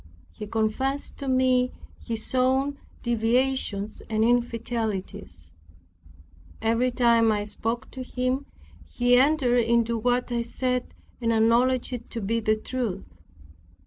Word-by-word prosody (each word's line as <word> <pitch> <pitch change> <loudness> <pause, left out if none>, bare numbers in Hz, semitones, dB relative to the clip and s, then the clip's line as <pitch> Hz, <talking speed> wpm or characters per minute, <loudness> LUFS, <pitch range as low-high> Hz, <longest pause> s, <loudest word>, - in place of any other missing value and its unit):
He 210 - -8
confessed 230 +6 -1
to 275 - -5
me 255 -1 +2 0.3
his 225 0 -4
own 265 +2 +1 0.2
deviations 235 -2 0
and 220 0 +1
infidelities. 225 - -2 1.1
Every 230 +3 +1
time 235 -2 +3
when - - +3
I 205 - -2
spoke 225 +4 -3
to 260 - -7
him 255 +2 -2 0.4
he 245 - +2
entered 260 -2 +4
into 235 0 +2
what 245 +2 0
I 235 -1 0
said, 250 +1 -2 0.3
and 230 -1 +1
acknowledged 235 +3 +2
it 240 -1 -6
to 230 - -4
be 225 +2 0
the 215 -1 +2
truth. 215 -4 -4
235 Hz, 125 wpm, -26 LUFS, 225-255 Hz, 1.1 s, entered